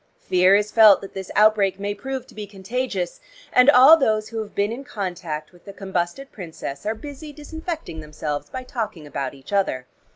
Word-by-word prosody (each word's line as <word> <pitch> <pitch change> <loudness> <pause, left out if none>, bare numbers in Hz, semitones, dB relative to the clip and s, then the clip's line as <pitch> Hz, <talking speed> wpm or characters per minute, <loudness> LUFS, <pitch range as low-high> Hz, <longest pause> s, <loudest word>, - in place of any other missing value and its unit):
Fear 185 +2 +4
is 210 +1 +1
felt 215 -3 +7
that 195 - -10
this 190 -1 -7
outbreak 210 -3 +4
may 205 +1 -2
prove 260 +4 -5
to - - -18
be 210 -1 -7
contagious, 195 -2 -4 0.3
and 250 +2 +6
all 290 +4 +9
those 215 -7 0
who 225 -1 -4
have 210 -1 -9
been 200 +2 +1
in 250 +4 -6
contact 175 - -5
with 175 -1 -21
the 200 - -9
combusted 190 +6 -4
princess 165 -3 -7
are 220 - 0
busy 290 +5 -9
disinfecting 315 - -7
themselves 150 -1 -5
by 260 0 -6
talking 225 - -5
about 140 -2 -4
each 135 +8 -12
other. 190 -11 0
205 Hz, 190 wpm, -23 LUFS, 180-250 Hz, 0.3 s, all